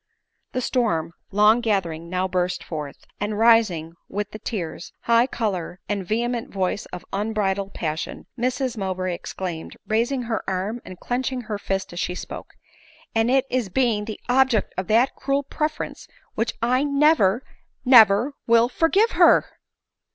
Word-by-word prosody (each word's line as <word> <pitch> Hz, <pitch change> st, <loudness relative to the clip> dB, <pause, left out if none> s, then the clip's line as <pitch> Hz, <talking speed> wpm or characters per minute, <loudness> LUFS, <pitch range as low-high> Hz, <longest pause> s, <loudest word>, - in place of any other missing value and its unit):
The 255 Hz, -, -1 dB
storm, 170 Hz, -11 st, 0 dB, 0.2 s
long 210 Hz, +4 st, +4 dB
gathering, 170 Hz, -7 st, -1 dB
now 185 Hz, +1 st, 0 dB
burst 180 Hz, -1 st, -1 dB
forth; 150 Hz, -4 st, -7 dB
and 205 Hz, +1 st, -2 dB
rising, 215 Hz, -8 st, +3 dB, 0.2 s
with 205 Hz, +1 st, -3 dB
the 215 Hz, -, -8 dB
tears, 175 Hz, -7 st, -5 dB
high 235 Hz, +1 st, +4 dB
color, 190 Hz, -8 st, -3 dB
and 205 Hz, -2 st, -2 dB
vehement 235 Hz, +4 st, -2 dB
voice 190 Hz, +1 st, -2 dB
of 180 Hz, -, -9 dB
unbridled 200 Hz, -1 st, -1 dB
passion, 155 Hz, -1 st, -4 dB
Mrs 250 Hz, 0 st, -1 dB
Mowbray 185 Hz, -2 st, -2 dB
exclaimed, 170 Hz, -1 st, -6 dB
raising 240 Hz, +4 st, 0 dB
her 230 Hz, -1 st, -2 dB
arm 195 Hz, +6 st, -2 dB
and 185 Hz, -1 st, -10 dB
clenching 255 Hz, +1 st, -2 dB
her 215 Hz, -3 st, -5 dB
fist 195 Hz, -2 st, -3 dB
as 175 Hz, -, -5 dB
she 180 Hz, -, -2 dB
spoke, -, -, -8 dB, 0.3 s
" -, -, -27 dB
And 225 Hz, +1 st, +3 dB
it 265 Hz, +1 st, +3 dB
is 245 Hz, -6 st, 0 dB
being 220 Hz, -1 st, +1 dB
the 215 Hz, -1 st, -6 dB
object 250 Hz, -4 st, +2 dB
of 185 Hz, -, -3 dB
that 230 Hz, +5 st, +3 dB
cruel 275 Hz, +1 st, 0 dB
preference, 305 Hz, +2 st, -4 dB, 0.3 s
which 225 Hz, +1 st, -1 dB
1 265 Hz, +4 st, +1 dB
never, 265 Hz, -7 st, +4 dB, 0.4 s
never 235 Hz, +1 st, +7 dB
will 230 Hz, +1 st, +5 dB
forgive 385 Hz, -, +3 dB
her -, -, +5 dB
215 Hz, 150 wpm, -23 LUFS, 185-245 Hz, 0.4 s, never